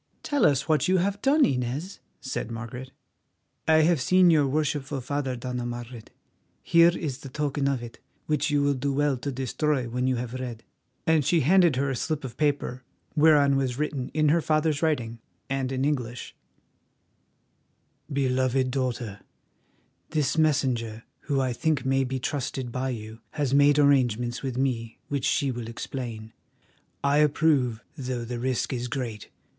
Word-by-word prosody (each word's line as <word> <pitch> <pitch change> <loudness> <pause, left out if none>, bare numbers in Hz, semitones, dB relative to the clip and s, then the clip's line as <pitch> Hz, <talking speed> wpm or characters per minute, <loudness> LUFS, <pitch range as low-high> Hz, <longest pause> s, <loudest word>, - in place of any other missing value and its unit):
"Tell 290 -4 +3
us 140 -1 +1
what 155 +1 +2
you 185 +1 +3
have 200 +3 0
done, 290 +2 +4
Inez?" 135 +8 -2 0.2
said 130 -3 -4
Margaret. 120 +3 -7 0.8
"I 160 0 +6
have 165 -3 +3
seen 185 +4 +5
your 150 -3 +4
worshipful 145 -1 -1
father, 135 0 -2
Dona 125 0 -4
Margaret; 120 -1 -7 0.5
here 170 0 +6
is 140 -5 -4
the 135 - -9
token 145 0 -1
of 135 -3 -1
it, 115 - -10 0.3
which 150 0 0
you 145 -1 +2
will 140 0 +3
do 140 +1 -1
well 145 0 +2
to 140 +3 -4
destroy 135 +1 -1
when 125 +2 -1
you 130 - +2
have 120 0 -4
read." 125 -3 -6 0.4
And 160 -2 +3
she 160 +4 +3
handed 175 0 +4
her 135 +1 0
a - - -2
slip 150 +4 -2
of 125 -3 -7
paper, 145 -4 -1 0.3
whereon 145 -3 +5
was 130 -3 -1
written 145 -3 -2
in 155 0 +2
her 165 +3 +3
father's 155 -1 +1
writing, 120 -8 -1 0.3
and 135 -1 -1
in 130 0 0
English: 125 -5 -3 1.8
"BELOVED 130 -1 +1
DAUGHTER, 125 -6 -2 0.9
"This 150 -3 0
messenger, 125 -8 +1 0.2
who 140 -2 0
I 130 -2 0
think 150 0 0
may 135 0 +2
be 130 +1 -3
trusted 130 -2 -3
by 130 +2 -2
you, 110 -2 -6
has 145 -4 -1
made 145 +1 +5
arrangements 125 -5 +2
with 130 -3 -4
me 120 -4 -1
which 140 -3 -1
she 140 -2 +1
will 120 -2 -5
explain. 115 -2 -6 0.7
I 140 +1 +3
approve, 145 -6 +2
though 125 -4 -4
the 120 0 -4
risk 130 +1 -1
is 125 -1 -3
great. 120 -4 -5
135 Hz, 160 wpm, -26 LUFS, 125-150 Hz, 1.8 s, I